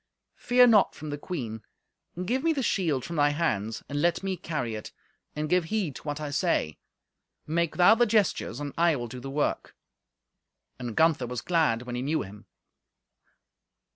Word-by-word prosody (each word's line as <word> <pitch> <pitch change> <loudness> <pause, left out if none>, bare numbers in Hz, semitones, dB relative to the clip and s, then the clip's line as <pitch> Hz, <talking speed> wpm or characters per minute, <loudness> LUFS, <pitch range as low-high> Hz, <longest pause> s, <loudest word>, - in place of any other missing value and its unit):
Fear 250 0 +5
naught 220 -5 +4
from 155 -1 -7
the 145 - -3
queen. 120 -11 -5 0.6
Give 260 +7 0
me 330 0 +3
the 275 -3 -2
shield 160 - 0
from 170 -1 -5
thy 145 0 +4
hands, 115 -9 -1
and 145 0 -2
let 170 +3 +1
me 190 -1 -1
carry 150 -9 -3
it, 110 -1 -7 0.4
and 155 0 -2
give 180 +1 +2
heed 180 -6 -2
to - - -12
what 145 0 -3
I 150 -1 -4
say. 145 - 0 0.7
Make 165 +1 -1
thou 180 +4 +7
the 240 +1 +3
gestures, 205 - +1
and 145 -1 -5
I 170 -2 +4
will 120 -3 -4
do 125 +2 -8
the 135 +2 -7
work." 145 +2 -2 1.0
And 120 -3 -5
Gunther 160 -6 +3
was 125 -1 -4
glad 155 -10 +1
when 125 -1 -7
he 120 - -2
knew 150 +4 0
him. 105 +2 -12
155 Hz, 180 wpm, -27 LUFS, 125-180 Hz, 1.0 s, thou